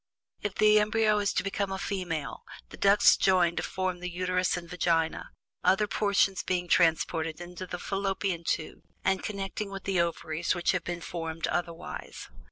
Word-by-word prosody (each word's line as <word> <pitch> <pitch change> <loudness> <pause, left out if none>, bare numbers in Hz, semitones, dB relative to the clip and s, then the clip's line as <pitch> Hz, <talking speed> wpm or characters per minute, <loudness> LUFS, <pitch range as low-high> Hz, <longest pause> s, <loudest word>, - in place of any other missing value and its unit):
If 205 -1 -3
the 215 0 +6
embryo 215 0 +2
is 205 -1 +1
to - - 0
become 195 0 -2
a 190 - -2
female, 175 -7 -3 0.3
the - - -10
ducts 200 +1 +6
join 180 -3 +3
to - - +1
form 185 -1 -2
the 180 0 -4
uterus 180 0 0
and 170 -1 -7
vagina, 165 -2 0 0.3
other 195 +4 +4
portions 200 -2 +2
being 180 -1 -1
transformed 165 -2 +2
into 180 +1 -7
the 180 - -4
fallopian 195 -2 -2
tubes 160 -1 -2 0.2
and 190 -1 +2
connecting 200 0 -4
with 195 -1 -7
the 190 -3 +1
ovaries 170 0 -1
which 175 - +1
have 180 -2 -1
been 175 0 -4
formed 165 -1 -4
otherwise. 170 -1 -4
180 Hz, 170 wpm, -29 LUFS, 170-195 Hz, 0.3 s, the